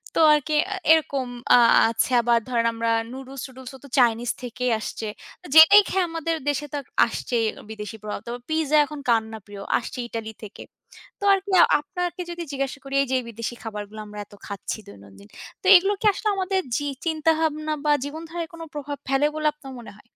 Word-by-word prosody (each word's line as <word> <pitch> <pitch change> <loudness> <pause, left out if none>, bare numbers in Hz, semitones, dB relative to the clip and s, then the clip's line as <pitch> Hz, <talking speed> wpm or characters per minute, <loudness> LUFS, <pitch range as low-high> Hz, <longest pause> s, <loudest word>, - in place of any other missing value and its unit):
তো - - +1
আরকি 300 +1 0 0.2
আ - - -3 0.2
এরকম 280 -5 0 0.3
আ - - +8 0.3
আছে 230 +3 0
আবার 235 0 +3
ধরেন 235 -2 +1
আমরা 230 0 -1 0.2
নুডলস 265 0 -8
টুডুলসওতো 260 +1 -12
চাইনিজ 235 0 +3
থেকেই 250 0 -2
আসছে। 220 0 -5 0.3
তো - - -18
যেটাই 395 +6 +9
খেয়ে 380 -1 +1
আমাদের 330 0 -2
দেশেতো 290 0 -3 0.3
আসছেই 230 0 -2 0.3
বিদেশী 215 0 -7
প্রভাব। 210 - -4
তো - - -4 0.2
পিজ্জা 315 -1 +2
এখন 295 0 -8
কার 230 -1 +4
না 220 - -7
প্রিয়? 205 -1 -10 0.2
আসছে 255 - -8
ইতালি 220 -1 -5
থেকে। 205 - -11 0.6
তো - - -10
আরকি 390 +1 -2 0.3
আপনাকে 350 +4 -4
যদি 345 0 -5
জিজ্ঞাসা 275 0 -3
করি 275 0 -5
এইযে 260 -1 0
বিদেশী 230 +1 -5
খাবারগুলো 210 -1 -7
আমরা 210 0 -9
এত 205 - -22
খাচ্ছি 200 +1 -5
দৈনন্দিন। 100 0 -15 0.3
তো - - -17
এগুলো 390 +3 +5
কি - - -3
আসলে 425 - -2
আমাদের 380 0 0 0.2
জি, 290 -1 -3 0.2
চিন্তাভাবনা 315 -1 0
বা 295 - +4
জীবনধারায় 325 +3 -6
কোন 330 - -11
প্রভাব 290 -1 -5
ফেলে 270 +2 +2
বলে 310 0 0
আপনার 275 -3 -11
মনে 235 - -10
হয়? - - -18
275 Hz, 180 wpm, -24 LUFS, 230-315 Hz, 0.6 s, যেটাই